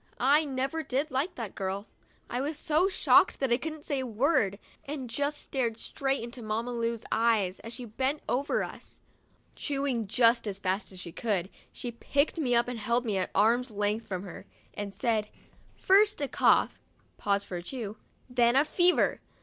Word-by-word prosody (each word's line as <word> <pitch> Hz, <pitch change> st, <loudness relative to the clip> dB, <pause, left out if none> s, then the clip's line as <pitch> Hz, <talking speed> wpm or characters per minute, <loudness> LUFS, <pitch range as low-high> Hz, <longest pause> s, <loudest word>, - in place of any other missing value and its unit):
I 290 Hz, +5 st, +4 dB
never 270 Hz, +3 st, -2 dB
did 285 Hz, +1 st, -2 dB
like 300 Hz, +8 st, -1 dB
that 230 Hz, -, -5 dB
girl 195 Hz, +1 st, -3 dB, 0.5 s
Winnie." 245 Hz, -, -3 dB
I -, -, 0 dB
was 295 Hz, +2 st, -3 dB
so 315 Hz, +5 st, +2 dB
shocked -, -, +4 dB
that 270 Hz, -3 st, 0 dB
I 240 Hz, -, +5 dB
couldn't 310 Hz, +1 st, -6 dB
say 280 Hz, -2 st, -1 dB
a 260 Hz, -, -2 dB
word, 220 Hz, -, +2 dB, 0.3 s
and 275 Hz, -3 st, -5 dB
just 285 Hz, +4 st, -2 dB
stared 235 Hz, -5 st, -2 dB
straight 270 Hz, +1 st, -2 dB
into 240 Hz, +1 st, -7 dB
Mamma 225 Hz, +2 st, -2 dB
Lu's 230 Hz, -1 st, -2 dB
eyes, 220 Hz, -5 st, +2 dB
as 230 Hz, -, -7 dB
she 250 Hz, +1 st, -6 dB
bent 260 Hz, +6 st, -2 dB
over 275 Hz, +4 st, 0 dB
56 -, -, -4 dB
THURSDAY— -, -, -15 dB
SPANKED -, -, -23 dB
us. -, -, -15 dB
Chewing 275 Hz, -5 st, 0 dB
just 230 Hz, +1 st, +3 dB
as 195 Hz, -2 st, -3 dB
fast 190 Hz, +1 st, -2 dB
as 185 Hz, -, -8 dB
she 175 Hz, -2 st, -6 dB
could, 195 Hz, -2 st, -1 dB, 0.2 s
she 245 Hz, -, -5 dB
picked 280 Hz, +7 st, 0 dB
me 250 Hz, -6 st, +2 dB
up 235 Hz, +1 st, +3 dB
and 245 Hz, -2 st, -4 dB
held 235 Hz, +3 st, 0 dB
me 210 Hz, -4 st, 0 dB
at 185 Hz, -, -1 dB
arms' 235 Hz, +5 st, +3 dB
length 210 Hz, +1 st, -1 dB
from 185 Hz, -1 st, -4 dB
her, 185 Hz, -, -10 dB, 0.3 s
and 205 Hz, -1 st, -5 dB
said: 210 Hz, +1 st, 0 dB, 0.5 s
"First 410 Hz, +2 st, +4 dB
a 285 Hz, -, -1 dB
cough* -, -, +3 dB, 0.4 s
(pause 200 Hz, -1 st, +1 dB
for 180 Hz, -, -6 dB
a -, -, -5 dB
chew), 220 Hz, +1 st, -6 dB, 0.3 s
"then 245 Hz, -1 st, +3 dB
fever!' 355 Hz, +3 st, +3 dB
240 Hz, 195 wpm, -29 LUFS, 210-275 Hz, 0.5 s, I